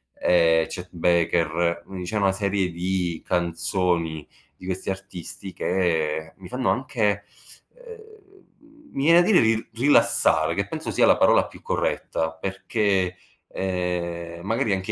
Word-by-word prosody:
ehm, 80 -2 +3
Chet 90 -1 -7
Baker; 85 0 +1
quindi 95 -2 -8
diciamo 100 +2 -1
una 95 - +3
serie 100 -2 0
di 90 -1 -2
canzoni 85 -2 -1 0.3
di 90 - -14
questi 95 +1 -4
artisti 95 -1 -7
che 80 -4 -1
mi 95 -2 -11
fanno 125 -1 -1
anche, 110 -5 0 0.5
ehm 445 -4 -14 0.6
mi 135 - -3
viene 170 +3 +7
da 175 - +1
dire 205 -5 +6
ril 110 0 +1
rilassare, 140 +5 +3
che - - -1
penso - - -5
sia - - +3
la - - +6
parola - - +4
più - - -14
corretta 80 0 -2
perché, 95 +1 -1 0.3
ehm, 85 -2 -3
magari 115 0 0
anche 95 0 -2
95 Hz, 135 wpm, -24 LUFS, 85-105 Hz, 0.6 s, viene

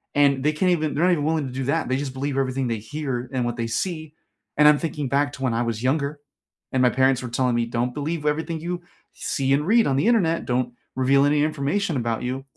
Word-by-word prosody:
and 140 -2 +3
they 150 +1 +2
can't 180 +4 +2
even 155 -4 0
they're 155 - +1
not 180 - +4
even 160 -5 +1
willing 155 -1 0
to 125 - -8
do 130 0 -3
that, 155 +4 0
they 130 - 0
just 140 -1 -4
believe 135 +1 -3
everything 135 -1 0
they 115 -1 -1
hear, 130 +1 -4
and 130 -2 -1
what 120 0 -2
they 115 -1 -2
see, 155 +5 -3 0.4
and 150 0 +7
I'm 150 -1 +6
thinking 150 -4 -3
back 145 +2 +1
to 130 - -7
when 130 -3 +1
I 115 - 0
was 115 -1 -2
younger, 140 +2 0 0.5
and 130 - +1
my 125 - +5
parents 130 0 +2
were 125 - -5
telling 125 +1 +1
me, 120 0 +1
"Don't 120 +1 -1
believe 150 +3 -3
w 150 - +1
everything 160 +2 -2
you 175 +2 -4 0.3
see 135 -1 -1
and 150 +3 +1
read 230 +3 +5
on 135 - +1
the 145 - +2
Internet, 180 -9 +2
don't 125 -1 -1 0.2
reveal 135 +2 +3
any 145 0 +3
information 155 +4 -1
about 115 -3 -1
you." 130 +2 -3
140 Hz, 255 wpm, -23 LUFS, 130-155 Hz, 0.5 s, and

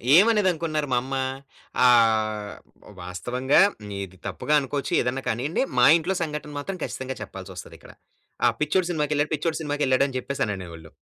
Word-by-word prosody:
ఏమనేదనుకున్నారు 175 -7 +3
మా - - +3
అమ్మ? 135 +2 -7 0.7
ఆహ్, 110 -3 +3 0.4
వ్ 105 - -15
వాస్తవంగా 125 - +1 0.4
ఇది 95 0 -11
తప్పుగా 150 - -2
అనుకోచ్చు, 140 +1 -3
ఏదన్నా 125 +2 -2
కానియ్యండి. 140 - 0 0.2
మా 125 - +7
ఇంట్లో 175 +4 -2
సంఘటన 150 -1 -5
మాత్రం 185 +5 -5
ఖచ్చితంగా 130 0 -4
చెప్పాల్సొస్తదిక్కడ. 95 -2 -10 0.5
ఆ - - +6
పిచ్చోడు 170 +4 +1
సినిమాకెళ్ళాడు, 150 -1 0
పిచ్చోడు 160 +2 -2
సినిమాకెళ్ళాడని 140 -3 +1
చెప్పేసననేవోళ్ళు. 95 - -4
135 Hz, 125 wpm, -25 LUFS, 110-150 Hz, 0.7 s, మా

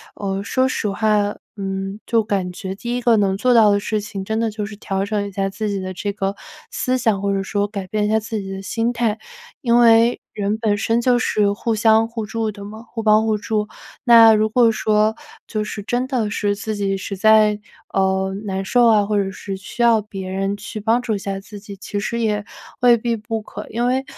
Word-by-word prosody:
呃， 195 -1 -3
说 260 +5 +1
实 225 -4 -2
话， 210 0 +1 0.2
嗯， 195 0 -4
就 230 -1 +2
感 195 -4 -2
觉 190 +1 -6
第 240 +4 -3
一 - - -3
个 240 -1 +4
能 195 -2 +1
做 250 +4 +3
到 220 -3 +6
的 200 - +2
事 210 +1 -2
情， 200 -2 -6
真 220 +2 -2
的 225 -1 0
就 210 0 -4
是 210 +1 -8
调 195 -1 -2
整 205 -1 -1
一 - - -8
下 195 0 -1
自 210 +2 -3
己 200 -1 -2
的 185 0 -5
这 200 +3 -3
个 195 -1 -2 0.3
思 255 - -1
想， 220 -6 +1
或 200 0 0
者 195 - 0
说 205 +1 -1
改 200 -2 -6
变 210 +2 0
一 - - -1
下 220 +1 +3
自 220 0 -4
己 195 0 -7
的 195 0 -5
心 225 +4 -1
态。 235 -3 0 0.4
因 235 -2 +3
为 230 0 +5
人 205 +1 -1
本 215 -2 0
身 225 +3 +1
就 245 0 +3
是 210 -3 +1
互 225 +2 -2
相 220 +1 +4
互 230 -2 -4
助 220 0 -2
的 200 -1 -10
嘛 215 +2 -9
互 230 -1 -6
帮 215 0 +4
互 215 -1 +1
助。 210 0 -2 0.4
那 230 -3 +8
如 215 0 +2
果 235 +1 +4
说 215 0 +1 0.3
就 215 -2 -2
是 210 0 -6
真 245 +4 -1
的 245 -6 -1
是 205 -1 -1
自 215 +1 -4
己 195 -1 -1
实 195 +1 -5
在， 215 0 +5 0.4
呃， 190 0 +1
难 190 -1 -3
受 240 +5 +3
啊， 215 -3 +4
或 210 +1 -1
者 195 - -4
是 195 0 -6
需 195 +5 -7
要 230 -2 +5
别 195 -3 -7
人 195 +1 -2
去 210 +1 -7
帮 230 +3 +2
助 230 -3 -1
一 - - -4
下 195 0 -4
自 205 +1 -11
己， 200 -1 -10
其 205 +1 -4
实 235 +3 -2
也 210 -2 0 0.4
未 245 -1 +6
必 235 +1 -1
不 220 0 -4
可。 210 0 -9
因 235 +2 -1
为， 260 +1 +1
210 Hz, 250 characters per minute, -20 LUFS, 200-225 Hz, 0.4 s, 那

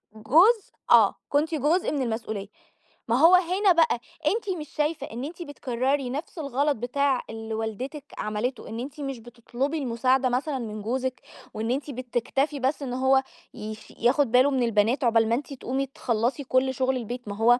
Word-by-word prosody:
جزء 345 - +4 0.2
آه. - - +7
كنتِ 310 +3 +1
جزء 310 +6 +1
من 285 -3 -1
المسؤوليّة. 220 -4 -3 0.6
ما 235 - +2
هو 335 +4 +8
هنا 370 +2 +3
بقى، 320 -8 +3 0.3
أنتِ 425 +1 0
مش 300 - -8
شايفة 300 -1 -1
إن 240 +3 -5
أنتِ 335 +4 -8
بتكرّري 265 -2 -1
نَفْس 295 +6 -5
الغلط 280 0 0
بتاع 265 +3 0
اللي 225 0 -6
والدتِك 250 +7 -4
عملته 215 +5 -3
إن 225 +1 -5
أنتِ 285 +4 -7
مش 270 -3 -4
بتطلبُي 240 +5 -4
المساعدة 255 0 +1
مثلًا 265 +2 -1
من 215 -2 -5
جوزِك، 255 +3 -2 0.3
وإن 220 +2 -2
أنتِ 285 +2 -2
بتكتفي 255 +3 -1
بس 270 +3 0
إن 250 -2 -4
هو 265 +1 +3 0.3
يف 215 -1 -8
ياخُد 250 +1 +3
باله 255 +3 +5
من 260 -2 +1
البنات 230 +4 +2
عقبال 225 -2 +3
ما 230 - +3
أنتِ 285 +2 -5
تقومي 270 +1 -2
تخلّصي 250 +1 -1
كل 260 0 +1
شُغل 260 0 0
البيت 245 0 -6
ما 200 - -4
هو 240 +3 +4
260 Hz, 175 wpm, -26 LUFS, 235-285 Hz, 0.6 s, هو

